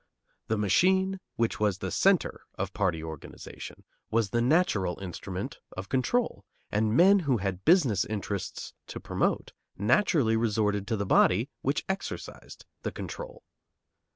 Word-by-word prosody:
The 110 Hz, -, 0 dB
machine, 190 Hz, -, +3 dB, 0.2 s
which 115 Hz, -1 st, 0 dB
was 105 Hz, -3 st, +1 dB
the -, -, -4 dB
centre -, -, +2 dB
of 95 Hz, 0 st, -3 dB
party 85 Hz, -6 st, 0 dB
organization, 80 Hz, -3 st, -9 dB, 0.3 s
was 110 Hz, -3 st, +1 dB
the 120 Hz, -, +1 dB
natural 120 Hz, -, +2 dB
instrument 90 Hz, -3 st, -6 dB, 0.2 s
of 95 Hz, +1 st, -6 dB
control, 130 Hz, -, 0 dB, 0.3 s
and 110 Hz, +2 st, +1 dB
men 195 Hz, +3 st, +7 dB
who 140 Hz, -8 st, +1 dB
had 95 Hz, -2 st, -3 dB
business 140 Hz, -, +4 dB
interests 100 Hz, -3 st, -4 dB
to -, -, -6 dB
promote -, -, -1 dB, 0.3 s
naturally 120 Hz, -, +3 dB
resorted 105 Hz, -3 st, +1 dB
to 110 Hz, -, 0 dB
the 100 Hz, -, -2 dB
body 100 Hz, +5 st, +3 dB
which 140 Hz, +2 st, -1 dB
exercised 190 Hz, 0 st, -6 dB, 0.2 s
the -, -, -3 dB
control. -, -, -7 dB
110 Hz, 135 wpm, -28 LUFS, 100-150 Hz, 0.3 s, men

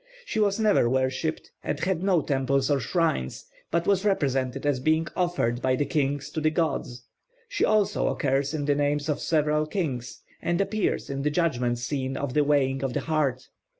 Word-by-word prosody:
She 360 Hz, -, -2 dB
was 205 Hz, 0 st, +2 dB
never 210 Hz, -, +3 dB
worshipped, 130 Hz, +5 st, -1 dB
and 145 Hz, -, -2 dB
had 180 Hz, 0 st, 0 dB
no 185 Hz, -4 st, +3 dB
temples 135 Hz, 0 st, +1 dB
or 140 Hz, -, +3 dB
shrines, 160 Hz, -, -1 dB, 0.2 s
but 170 Hz, +1 st, 0 dB
was 195 Hz, -1 st, +2 dB
represented 135 Hz, -9 st, 0 dB
as 145 Hz, -3 st, +1 dB
being 155 Hz, +4 st, +2 dB
offered 170 Hz, -10 st, 0 dB
by 130 Hz, 0 st, +2 dB
the 145 Hz, -, 0 dB
kings 140 Hz, -2 st, -1 dB
to 155 Hz, -, -3 dB
the 155 Hz, -, +3 dB
gods. 140 Hz, -7 st, -2 dB, 0.4 s
She -, -, -1 dB
also 215 Hz, -2 st, +2 dB
occurs 135 Hz, 0 st, 0 dB
in 145 Hz, -2 st, -2 dB
the 145 Hz, -, +3 dB
names 145 Hz, +1 st, 0 dB
of 150 Hz, -, 0 dB
several 150 Hz, -1 st, +1 dB
kings, 130 Hz, -, -3 dB, 0.2 s
and 170 Hz, 0 st, 0 dB
appears 200 Hz, -5 st, -1 dB
in 140 Hz, 0 st, -3 dB
the 150 Hz, -, +1 dB
judgment 130 Hz, -7 st, 0 dB
scene 130 Hz, +2 st, -3 dB
of 140 Hz, -3 st, -3 dB
the 150 Hz, -, +3 dB
weighing 135 Hz, -2 st, +1 dB
of 135 Hz, -2 st, -1 dB
the -, -, -1 dB
heart. 145 Hz, -5 st, -1 dB
145 Hz, 185 wpm, -26 LUFS, 135-165 Hz, 0.4 s, never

